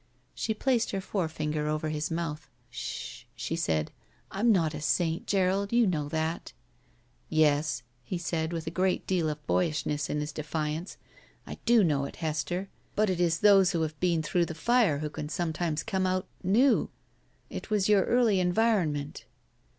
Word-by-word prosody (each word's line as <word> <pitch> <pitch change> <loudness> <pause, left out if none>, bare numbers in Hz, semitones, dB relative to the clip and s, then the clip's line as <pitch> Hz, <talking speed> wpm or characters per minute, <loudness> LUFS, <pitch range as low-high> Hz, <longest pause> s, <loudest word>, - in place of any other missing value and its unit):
She 220 - -2
placed 245 0 +1
her 195 - -2
forefinger 155 -6 -2
over 155 +1 -1
his 150 0 -2
mouth. 160 -3 -4 0.2
"Sh - - -6
h!" - - -25
she - - -3
said. 80 -1 0 0.4
"I'm 225 +4 +2
not 165 -6 +2
a 150 - -5
saint, 165 +2 0
Gerald; 195 +1 +1
you 235 0 +4
know 155 -7 -1
that." 160 +2 -2 0.8
"Yes," 150 -4 +2 0.2
he 180 +9 -3
said, 165 -1 -2
with 165 -2 -4
a 160 - -3
great 185 +2 0
deal 175 -4 +1
of 150 0 -6
boyishness 150 -4 0
in 150 - -1
his 150 +1 -3
defiance, 155 +3 -3 0.5
"I - - -8
do 235 -2 +6
know 145 -5 +1
it, - - -8
Hester, 160 +4 -2 0.3
but 210 -2 +2
it 180 - -2
is 170 -1 +1
those 195 -2 +6
who 165 -2 +1
have 155 -1 -4
been 170 -3 +1
through 170 +2 +1
the 160 - -6
fire 220 - +3
who 150 +1 -3
can 150 -1 -5
some 170 0 -2
times 155 -2 -1
come 190 -1 0
out 185 0 0 0.2
— - - -29
^new. 230 +9 +3 0.6
It - - -6
was 210 -3 +2
your 205 -2 +5
early 235 -5 +3
environ 185 -1 +2
ment." 145 0 -6
170 Hz, 180 wpm, -29 LUFS, 155-190 Hz, 0.8 s, do